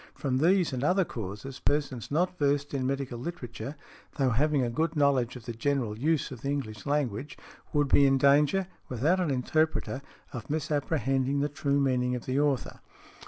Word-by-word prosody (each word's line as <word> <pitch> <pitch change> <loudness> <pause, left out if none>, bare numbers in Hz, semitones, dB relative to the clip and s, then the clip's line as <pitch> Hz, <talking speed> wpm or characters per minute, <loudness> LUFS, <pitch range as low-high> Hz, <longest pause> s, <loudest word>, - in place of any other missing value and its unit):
From 130 -2 -1
these 175 0 +3
and 130 0 -2
other 180 +4 +3
causes, 110 +4 -6
persons 140 -6 -1
not 175 +5 +1
versed 145 0 +1
in 130 -2 0
medical 135 -3 -3
literature, 135 -2 -6 0.4
though 135 -4 +2
having 145 +3 +2
a 120 - 0
good 160 +6 -1
knowledge 140 -5 +2
of 120 -2 -10
the 120 - -4
general 120 -2 -1
use 150 +5 0
of 125 - -8
the 140 - -3
English 115 -7 -4
language, 145 -2 -1 0.3
would 145 -1 +2
be 140 +1 +5
in 135 0 +4
danger, 145 +7 +4 0.2
without 145 +10 +1
an 180 -4 0
interpreter, 140 +1 0 0.3
of 120 -3 -7
misapprehending 140 -2 0
the 145 - 0
true 140 0 0
meaning 125 -2 +1
of 125 - -6
the 130 +2 0
author. 145 -3 0
140 Hz, 175 wpm, -28 LUFS, 125-150 Hz, 0.4 s, be